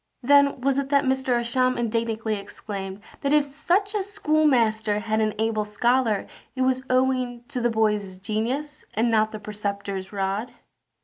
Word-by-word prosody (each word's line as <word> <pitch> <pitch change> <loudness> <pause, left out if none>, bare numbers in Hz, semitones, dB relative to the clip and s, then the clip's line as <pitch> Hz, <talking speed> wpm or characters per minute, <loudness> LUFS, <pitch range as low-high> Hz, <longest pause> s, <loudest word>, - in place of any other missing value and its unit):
Then 280 0 +4
was 275 +1 +2
it 275 -1 -3
that 280 0 +3
Roger 265 -1 +1
Ascham 255 +1 +1
indignantly 225 -1 -1
exclaimed, 200 -1 -6 0.2
that 280 +1 +1
if 300 -1 +5
such 350 +8 0
a 420 - 0 0.5
master 220 -5 +2
had 220 +1 -1
an 215 -1 0
able 220 -1 0
scholar 225 +1 +1 0.3
it 260 - 0
was 260 0 +2
owing 255 -2 +1
to 250 - -3
the 240 - +2
boy's 210 -4 0
genius, 235 +9 -3
and 230 +2 +2
not 215 -1 +3
the 215 - -5
preceptor's 200 -2 -4
rod. 200 +3 -2
230 Hz, 160 wpm, -25 LUFS, 210-260 Hz, 0.5 s, if